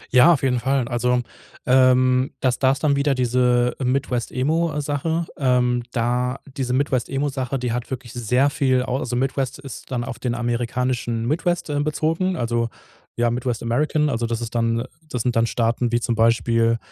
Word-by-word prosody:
Ja, 125 +7 +8
auf 140 - -2
jeden 125 -2 +2
Fall, 135 -1 0
also, 125 +1 +1 0.4
ähm, 130 0 +4
das 125 -2 0
da 130 - +4
ist 140 - -3
dann 145 -2 +3
wieder 140 -1 +1
diese, 125 0 +2
äh, - - -3
„Midwest-Emo“, 135 +5 0
äh, - - -1
Sache. 160 +3 -1
Ähm, 125 -2 +2
da 125 +2 0 0.2
diese 125 -2 -2
Midwest-Emo-Sache, 135 0 -1
die 125 -2 -2
hat 120 0 -3
wirklich 130 -3 -6
sehr 125 +4 +1
viel 130 -3 +1
au 130 0 -2
also, 120 -1 -3
Midwest 135 +1 -1
ist 140 -3 -10
dann 120 -2 -2
auf 130 0 -6
den 120 -2 -2
amerikanischen 120 0 -1
Midwest 170 +3 -1
ähm, 145 0 0
bezogen, 165 +4 0
also, 115 -3 -1 0.5
ja, 120 0 +1
Midwest 120 -1 -2
American, 150 +5 +1
also, 115 -2 -1
das 115 0 -2
ist 115 0 -5
dann 115 0 +1
äh, - - -5 0.2
das 125 -3 -2
sind 125 -2 0
dann 115 0 +3
Staaten 115 +1 0
wie 120 - +2
zum 120 - -1
Beispiel 115 0 +2
125 Hz, 185 wpm, -22 LUFS, 120-135 Hz, 0.5 s, Ja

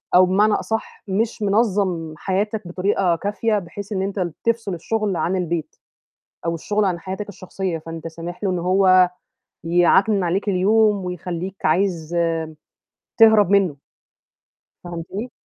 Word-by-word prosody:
أو 185 0 +8
بمعنى 205 +3 +3
أصح 220 0 -3
مش 220 +3 -1
منَظّم 195 -6 +1
حياتك 205 0 -2
بطريقة 180 -1 +1
كافية، 210 +4 -1
بحيث 200 +3 -9
إن 190 - -1
أنت 195 +1 -3
ال 175 -3 -2
تفصل 230 -4 0
الشُغل 210 +3 -1
عن 185 +3 0
البيت، 170 -3 -3 0.7
أو 165 0 0
الشُغل 205 +5 0
عن 175 -3 0
حياتَك 190 +4 -6
الشخصية، 185 -2 -4
فأنت 165 +1 -7
سامح 170 +4 -8
له 195 - +1
إنه 175 -2 -1
هو 185 0 +5 0.5
يعكنِن 180 +4 +3
عليك 190 +4 0
اليوم 205 +1 +3
ويخلّيك 180 +1 -5
عايز 170 -1 +1
آمم، 165 -1 +1 0.8
تهرب 220 -4 +6
منه. 195 -7 +3 1.1
فهمتني؟ 175 +7 -6
190 Hz, 135 wpm, -21 LUFS, 175-205 Hz, 1.1 s, أو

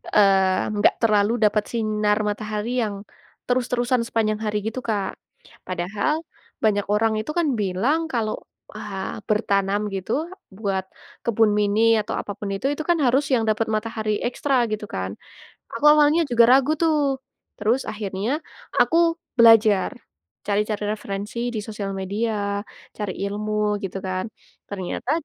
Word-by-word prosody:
eee, 190 -2 +4
enggak 205 - +3
terlalu 215 -1 +3
dapat 210 0 +2
sinar 215 -2 +1
matahari 210 +1 -3
yang, 210 -2 -3 0.5
terus-terusan 250 0 +1
sepanjang 215 -2 0
hari 210 0 0
gitu 230 +3 -3
Kak. 200 -3 -1 0.5
Padahal 185 - -1 0.5
banyak 205 -2 +2
orang 220 +1 +2
itu 220 - -5
kan 340 -3 +2
bilang 205 - +1
kalau, 220 -3 0 0.4
wah, 205 -1 -5
bertanam 200 -1 +1
gitu 190 +3 -4 0.5
buat 195 -3 -1 0.4
kebun 225 -2 +3
mini 210 +1 +2 0.2
atau 210 - -4
apa - - -7
pun 205 - -4
itu, 195 - -1
itu 310 - -4
kan 345 - +4
harus 260 +3 +3
yang 230 -3 +3
dapat 215 +1 +1
matahari 215 -1 -2
ekstra 270 +2 -1 0.2
gitu 215 0 -3
kan, 95 +1 -3 0.6
aku 230 +6 -5
awalnya 300 +2 +5
juga 235 -1 +6
ragu 275 +3 +4
tuh, 300 -4 +2 0.4
terus 225 +5 +1
akhirnya 210 +8 -3 0.4
aku 330 - +4 0.4
belajar, 220 -4 +6 0.5
cari-cari 210 +1 0
referensi 205 +1 -5 0.2
di 215 - -1
sosial 205 -2 -5
media, 200 +1 -2 0.4
cari 205 -3 -3
ilmu 210 0 -1
gitu 195 0 -4
kan. 185 0 -2 0.4
Ternyata, 190 -3 -4
210 Hz, 135 wpm, -23 LUFS, 200-230 Hz, 0.6 s, juga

